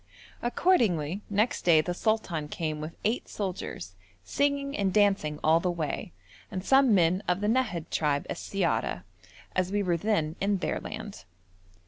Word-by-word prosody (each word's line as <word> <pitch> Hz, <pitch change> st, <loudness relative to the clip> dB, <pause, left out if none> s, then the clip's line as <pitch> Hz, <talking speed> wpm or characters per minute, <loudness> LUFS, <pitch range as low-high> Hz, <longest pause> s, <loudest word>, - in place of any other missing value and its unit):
Accordingly 210 Hz, -, +2 dB
next 210 Hz, +3 st, +1 dB
day 165 Hz, -3 st, +5 dB
the 175 Hz, +3 st, -1 dB
sultan 180 Hz, -7 st, -1 dB
came 155 Hz, 0 st, -3 dB
with 155 Hz, +2 st, -7 dB
eight 220 Hz, +4 st, -1 dB
soldiers, 180 Hz, -, -5 dB, 0.3 s
singing 280 Hz, -, 0 dB
and 195 Hz, -2 st, +1 dB
dancing 195 Hz, -7 st, +2 dB
all 160 Hz, +1 st, +5 dB
the 180 Hz, -, -1 dB
way, 160 Hz, -, -3 dB, 0.4 s
and 185 Hz, +1 st, -5 dB
some 270 Hz, -5 st, +5 dB
men 180 Hz, +1 st, +3 dB
of 180 Hz, +1 st, +1 dB
the 210 Hz, -, -1 dB
Nahad 220 Hz, -9 st, 0 dB
tribe 145 Hz, -2 st, 0 dB
as -, -, -4 dB
siyara, 170 Hz, -, -1 dB, 0.5 s
as 185 Hz, 0 st, 0 dB
we 205 Hz, 0 st, +1 dB
were 175 Hz, -3 st, +1 dB
then 165 Hz, -5 st, 0 dB
in 200 Hz, 0 st, +2 dB
their 180 Hz, -, -2 dB
land. 210 Hz, -, -8 dB
185 Hz, 155 wpm, -28 LUFS, 160-215 Hz, 0.5 s, day